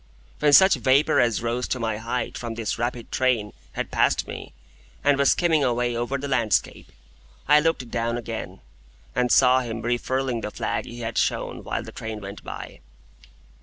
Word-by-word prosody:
When 150 -1 +4
such 190 +6 +8
vapour 130 +4 +3
as 115 -2 +2
rose 120 +2 -1
to 130 - -2
my 110 -2 -1
height 115 +3 -3
from 115 -2 -5
this 115 -2 -3
rapid 120 -1 -3
train 120 -5 +1 0.2
had - - -4
passed - - +2
me, - - -8 0.5
and 145 0 +4
was 140 0 +3
skimming 165 -4 +2
away 120 -1 0
over 120 +4 -1
the 140 +2 -5
landscape, 120 -6 0 0.6
I 150 0 +7
looked 150 -6 -1
down 115 0 -1
again, 115 -1 -6 0.5
and 125 -1 +1
saw 130 0 +6
him 115 -3 -5
refurling 120 +1 -1
the 105 - -3
flag - - -3
he 120 0 -9
had 115 -1 -2
shown - - -1
while - - -3
the - - -9
train 110 -1 -6
went 100 0 -9
by. - - -8
120 Hz, 175 wpm, -24 LUFS, 115-130 Hz, 0.6 s, such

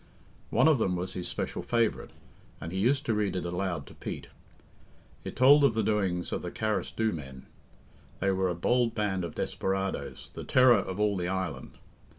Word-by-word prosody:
One - - +4
of 155 -5 +4
them 95 -4 +1
was 90 +1 -4
his 90 -1 -4
special - - -3
favourite, 115 -2 0 0.5
and 85 - -6
he 95 - -2
used 135 +7 +2
to 115 - +1
read 105 -2 0
it 90 - -2
aloud 90 0 -2
to - - -13
Pete. - - -7 0.9
It - - -6
told 140 +3 +7
of 135 -5 +4
the 110 - +1
doings 95 -5 0
of - - -2
the 90 - -4
Carrasdhoo 110 +2 -1
men. 65 -4 -8 0.7
They 100 - +1
were 95 -1 +1
a 90 - -2
bold 120 +6 +1
band 100 -4 -1
of 85 - -6
desperadoes, 95 0 -3
the - - -7
terror 130 -2 +5
of 95 +2 -5
all 105 -1 +2
the 90 -1 -2
island. 95 -4 -4
95 Hz, 185 wpm, -29 LUFS, 90-115 Hz, 0.9 s, told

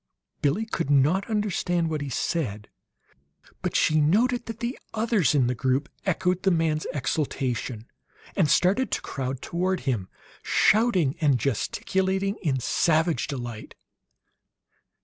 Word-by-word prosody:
Billie 155 +10 +1
could 170 -9 -3
not 145 +9 +3
understand 185 -5 0
what 155 -2 -2
he 145 - -4
said; 115 -6 -2 0.9
but - - -3
she 155 0 +3
noted 235 +10 +2
that 230 -1 -6
the 240 +3 -2 0.2
others 220 -8 +2
in 135 -3 +4
the 125 - +1
group 130 +5 0 0.2
echoed 180 0 +1
the 195 - +3
man's 160 -3 +1
exultation, 130 -5 -2 0.5
and 170 -7 +2
started 195 - +3
to - - 0
crowd 135 -1 -4
toward 185 +2 -1
him, 115 -9 -2 0.3
shouting 190 - +3
and 145 -4 +4
gesticulating 190 - -1
in 140 -7 -1
savage 160 +1 +1
delight. 120 -5 -6
160 Hz, 130 wpm, -26 LUFS, 135-190 Hz, 0.9 s, in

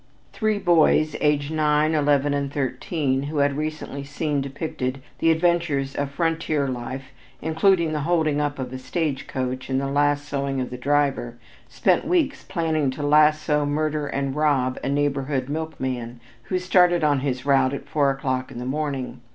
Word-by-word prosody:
Three 215 -2 0
boys, 160 -4 +3
aged 150 -1 +1
nine, 155 0 +2
eleven 145 -1 +2
and 140 -1 -1
thirteen 140 +1 -1
years, 140 - -4
who 155 - -4
had 140 -1 +2
recently 155 -2 -4
seen 145 0 -2
depicted 135 -2 -4 0.2
the 165 - +3
adventures 160 -5 +1
of 140 -1 -2
frontier 160 -1 0
life 130 +1 -5 0.3
including 160 +1 +2
the 150 - -1
holding 155 -1 +1
up 145 -1 -2
of 130 -1 -5
a 130 - -5
stage 150 0 -2
coach 130 0 -3
and 130 0 +1
the 140 - -2
lassoing 145 -1 0
of 125 - -3
the - - -4
driver, 135 -3 0 0.3
spent - - +2
weeks 315 -6 +1
planning 160 -5 0
to 140 +3 -5
lasso, 150 0 +4
murder, 150 0 -1
and 140 -1 -2
rob 140 -4 +1
a - - -1
neighborhood 140 -2 0
milkman, 130 -6 -4 0.3
who 185 - -1
started 180 -2 +3
on 145 -2 +3
his 130 -2 -3
route 135 -2 +3
at - - -8
four 145 -2 +2
o'clock 130 -1 -2
in - - -9
the 125 - -5
morning. 135 -1 -3
145 Hz, 165 wpm, -23 LUFS, 135-155 Hz, 0.3 s, lasso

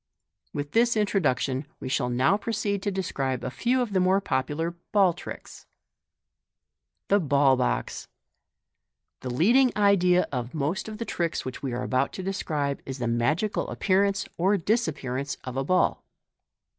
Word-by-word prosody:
With 145 0 -4
this 235 0 +3
introduction, 145 - 0
we 130 - -6
shall 125 -1 0
now 130 +9 +3
proceed 205 -2 -2
to 205 - -1
describe 135 -9 -2
a 125 - -3
few 250 - +1
of 220 -4 -6
the 190 - +3
most 190 +2 +3
popular 145 +4 -1
" - - -51
ball 195 -4 +5
tricks." 180 - -10 1.4
The 200 - +5
Ball 140 -4 +3
Box. 125 -1 -2 0.6
— - - -58
The 130 - -5
leading 235 - +4
idea 180 -3 +4
of 125 +1 -4
most 155 +9 -2
of 215 - -7
the 230 - -4
tricks 170 -6 -2
which 130 - -6
we 135 - -3
are 120 +1 -3
about 130 +2 0
to 190 - -6
describe 150 -7 -2
is 135 0 -6
the 120 - -3
magical 130 - 0
appearance 195 0 +1
or 195 +4 +3
disappearance 150 - -1
of 130 -1 -6
a 135 - 0
ball. 180 +6 +1
165 Hz, 160 wpm, -26 LUFS, 130-200 Hz, 1.4 s, ball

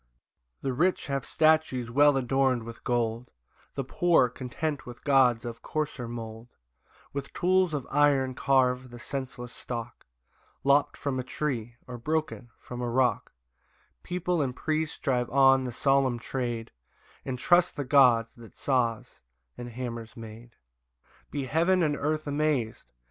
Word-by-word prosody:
4 135 - -1
The - - -1
rich 175 +8 +1
have 140 -2 -3
statues 155 -7 +2
well 145 +2 +5
adorn'd 130 -1 +1
with 115 0 -10
gold; 120 0 -1 0.5
The 135 - -2
poor, 160 -1 +3
content 135 +4 -4
with 120 -1 -10
gods 125 -5 +4
of 115 -1 -6
coarser 150 -5 -3
mould, 115 0 -7 0.6
With 140 0 -5
tools 185 0 +2
of 140 - -3
iron 140 -3 +3
carve 130 -1 +2
the 120 - -10
senseless 125 -1 -6
stock, 120 - -7 0.6
Lopt 140 +2 +3
from 135 -2 -2
a - - -2
tree, 120 -4 -3
or 125 -1 -8
broken 155 -3 -2
from 125 0 -8
a 120 - -2
rock: 125 +1 +1 0.7
People 180 -1 -1
and 130 -3 -2
priest 155 +2 -2
drive 125 -3 0
on 135 0 +5
the 125 - -3
solemn 135 0 +2
trade, 120 -2 -4 0.5
And 130 -2 -4
trust 175 +7 +3
the 145 - -3
gods 125 -4 +5
that 115 -2 -14
saws 120 -5 -1 0.3
and 120 0 -7
hammers 115 0 -6
made.] 115 +1 -11 0.7
5 - - -46
Be 140 -2 -3
heaven 170 +6 +2
and 150 -2 +1
earth 155 +2 -1
amaz'd! 145 - -1
130 Hz, 150 wpm, -28 LUFS, 120-145 Hz, 0.7 s, well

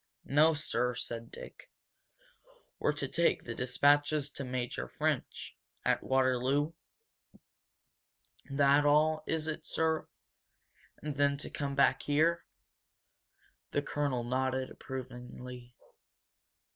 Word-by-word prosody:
"N$1 155 +3 +5
$2 - - -4
sir," 125 -4 0
said 115 -1 -5
Dick. - - -11 1.1
"We're - - +2
to 145 -2 -2
take 170 +5 +2
the 120 - -5
dispatches 145 +4 +2
to 140 - -6
Major 125 - -3
French, - - -2 0.3
at - - +2
Waterloo? 130 +3 +2 1.8
That 140 +1 +4
all, 155 +1 +3
is 160 -1 -1
it, 155 -1 -3
sir? 160 -1 0 1.0
And 150 -2 -4
then 140 0 +3
to 140 - -6
come 140 -1 -3
back 140 - +4
here?" 160 +4 +2 1.3
The 145 - +1
colonel 140 -4 -1
nodded 130 +1 -1
approvingly. 125 -1 -8
140 Hz, 105 wpm, -32 LUFS, 125-150 Hz, 1.8 s, N$1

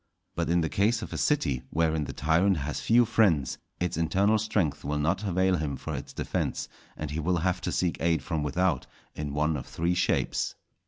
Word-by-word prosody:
But - - -2
in 85 0 +3
the 80 - +1
case 110 +7 +1
of - - -7
a - - -3
city, 70 - +1
wherein 80 -1 +1
the 70 - -5
tyrant 85 +7 +2
has 75 +1 -3
few 120 +1 +5
friends, 95 - +2 0.2
its 90 -2 -1
internal 100 +6 +2
strength 90 -10 0
will 75 +1 -1
not 80 +7 0
avail 95 -1 +2
him 75 -4 -2
for - - -5
its - - -5
defence, - - -2 0.3
and 75 -1 -4
he 75 - -2
will 90 +3 +1
have 90 +2 0
to - - -2
seek 90 -2 0
aid 85 -1 +1
from 80 -3 -2
without 75 +1 0 0.3
in 75 -1 -4
one 75 +1 +1
of 65 - -5
three 85 +2 0
shapes. 90 +1 0
85 Hz, 205 wpm, -28 LUFS, 75-95 Hz, 0.3 s, few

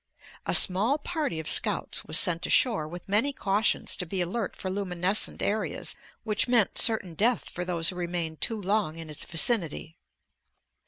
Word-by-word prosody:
A - - +2
small 210 +10 +5
party 305 - -4
of 160 - -7
scouts - - 0
was 155 +1 +3
sent 170 -1 +2
ashore 210 -12 +3
with 175 +2 -10
many 215 +8 +1
cautions 210 -4 0
to 180 - -4
be 190 +3 -4
alert 185 +4 -3
for 185 - -6
luminescent 185 0 -1
areas 215 +2 -3 0.3
which 215 +1 0
meant 240 -5 +3
certain 215 -6 +4
death 225 +8 0
for 180 - -5
those 170 -2 +1
who 185 - -5
remained 170 -3 -4
too 225 -2 -1
long 195 -5 -1
in 165 -2 -9
its 150 - -2
vicinity. 165 - -1
190 Hz, 165 wpm, -26 LUFS, 170-220 Hz, 0.3 s, small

